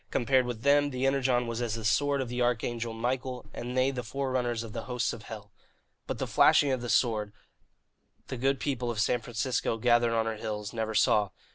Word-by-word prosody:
Compared 130 +2 +2
with 120 -2 -5
them, 145 0 +4
the 130 -1 -2
Energon 130 -2 +2
was 115 0 -3
as 115 -2 -1
the 115 -1 -6
sword 140 +5 +2
of 130 - -3
the 125 +1 -3
arch 120 -1 +1
angel 115 -1 -3
Michael, 125 +2 -3
and 125 +1 -5
they 130 +1 +3
the 130 -2 -4
forerunners 125 -2 -2
of 110 -2 -9
the - - -5
hosts 125 -3 -1
of 115 - -8
hell. 105 -1 -10 0.6
But - - -3
the - - -2
flashing 145 - +4
of 130 -2 -1
the 120 - -5
sword, 110 -5 +1 1.0
the - - -4
good 135 +2 0
people 125 -4 -2
of 115 -2 -3
San 120 +2 +1
Francisco, 120 0 -1
gathered 120 0 +3
on 115 0 +1
her 110 -1 -3
hills, 105 -1 -5
never 110 -1 -3
saw. 105 -1 +3
120 Hz, 215 wpm, -29 LUFS, 115-130 Hz, 1.0 s, them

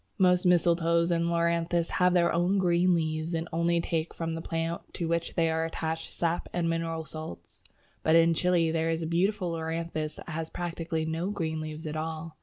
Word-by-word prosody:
Most 180 -1 +4
Mistletoes 170 -1 +3
and 170 0 +2
Loranthus 170 0 +1
have 180 0 +3
their 170 -1 +3
own 175 +4 +2
green 180 -1 +3
leaves, 160 0 -1
and 165 +1 -2
only 170 +1 +2
take 165 -1 -2
from 165 -1 -3
the 165 - -4
plant 165 +1 -2
to 170 - -2
which 170 0 -1
they 165 -1 +3
are 160 0 0
attached 160 0 -3
sap 170 0 -1
and 175 -1 0
mineral 165 -1 -2
salts. 155 - -9 0.4
But 160 - +3
in 165 0 +6
Chile 170 -1 +2
there 165 0 0
is 165 0 -1
a - - -2
beautiful 180 +3 +1
Loranthus 160 -1 -3
that - - -10
has 160 0 -4
practically 165 -2 -3
no 165 +4 -2
green 160 -6 -2
leaves 155 +1 -6
at 155 0 -4
all. 160 0 -4
165 Hz, 195 wpm, -28 LUFS, 160-170 Hz, 0.4 s, in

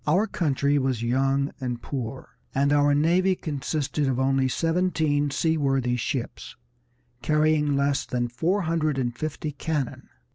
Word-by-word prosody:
Our 185 +8 +3
country 145 -7 +1
was 130 -4 -1
young 135 +3 +1
and 125 -3 -3
poor, 130 0 -5 0.3
and 140 +2 +3
our 145 0 +4
navy 180 +5 +3
consisted 145 -1 -2
of 130 -1 0
only 135 0 +2
seventeen 160 -1 +1
seaworthy 135 -4 +1
ships, 125 +1 -4 0.7
carrying 150 +1 +2
less 140 0 0
than 120 -1 -1
four 165 +12 0
hundred 155 -3 0
and 120 -2 -1
fifty 155 +3 -4
cannon. 145 -2 -3
145 Hz, 135 wpm, -25 LUFS, 130-155 Hz, 0.7 s, our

